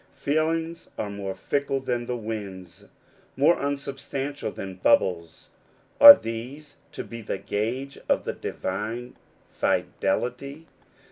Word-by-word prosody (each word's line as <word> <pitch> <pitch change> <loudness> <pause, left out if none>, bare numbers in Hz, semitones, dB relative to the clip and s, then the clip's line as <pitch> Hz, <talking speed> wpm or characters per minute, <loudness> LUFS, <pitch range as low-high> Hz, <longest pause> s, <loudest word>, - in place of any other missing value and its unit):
Feelings 160 +3 -1
are 105 - -3
more 100 -1 -5
fickle 140 +7 -1
than 120 -2 -3
the 125 - -2
winds, 100 -6 -7 0.5
more 155 +5 +4
unsubstantial 140 0 -4
than 95 -1 -7
bubbles: 85 -3 +1 0.5
are 285 0 +13
these 125 +7 -7 0.2
to - - -5
be 115 0 -9
the 105 - -4
gauge 120 +9 -3
of - - +2
the - - -2
divine 110 +6 -5 0.4
fidelity? 140 +6 -2
125 Hz, 115 wpm, -25 LUFS, 105-140 Hz, 0.5 s, are